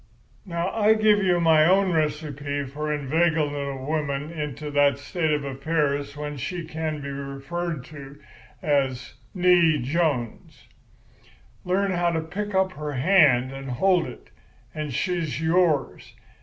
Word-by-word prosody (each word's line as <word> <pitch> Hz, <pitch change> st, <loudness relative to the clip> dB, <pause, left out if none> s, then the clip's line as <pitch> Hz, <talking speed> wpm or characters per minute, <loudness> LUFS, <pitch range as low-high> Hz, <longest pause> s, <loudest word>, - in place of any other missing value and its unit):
"Now, 170 Hz, +1 st, -2 dB
I 220 Hz, 0 st, +4 dB
give 215 Hz, -1 st, +4 dB
you 180 Hz, -2 st, +2 dB
my 160 Hz, -2 st, +5 dB
own 190 Hz, +1 st, +3 dB
recipe 145 Hz, -3 st, -2 dB
for 150 Hz, +3 st, -4 dB
inveigling 150 Hz, +1 st, +1 dB
a 140 Hz, -2 st, -4 dB
woman 150 Hz, 0 st, -2 dB
into 150 Hz, -2 st, -5 dB
that 145 Hz, -1 st, +3 dB
state 160 Hz, +3 st, -2 dB
of 150 Hz, -1 st, 0 dB
affairs 140 Hz, 0 st, -1 dB
when 150 Hz, 0 st, -5 dB
she 170 Hz, +5 st, -4 dB
can 155 Hz, -1 st, -4 dB
be 140 Hz, -, -6 dB
referred 140 Hz, +2 st, -5 dB
to 140 Hz, -2 st, -11 dB, 0.4 s
as 135 Hz, -4 st, 0 dB, 0.2 s
'née 175 Hz, -6 st, +4 dB
Jones.' 140 Hz, -5 st, -2 dB, 1.0 s
Learn 195 Hz, +2 st, 0 dB
how 175 Hz, -1 st, +1 dB
to 165 Hz, -1 st, -1 dB
pick 195 Hz, +5 st, -5 dB
up 190 Hz, 0 st, +2 dB
her 150 Hz, -3 st, -5 dB
hand 135 Hz, -4 st, +4 dB
and 135 Hz, 0 st, -7 dB
hold 175 Hz, +7 st, +2 dB
it, -, -, -12 dB, 0.4 s
and 155 Hz, -2 st, -4 dB
she's 165 Hz, 0 st, -2 dB
yours. 160 Hz, -4 st, 0 dB
155 Hz, 140 wpm, -24 LUFS, 140-175 Hz, 1.0 s, my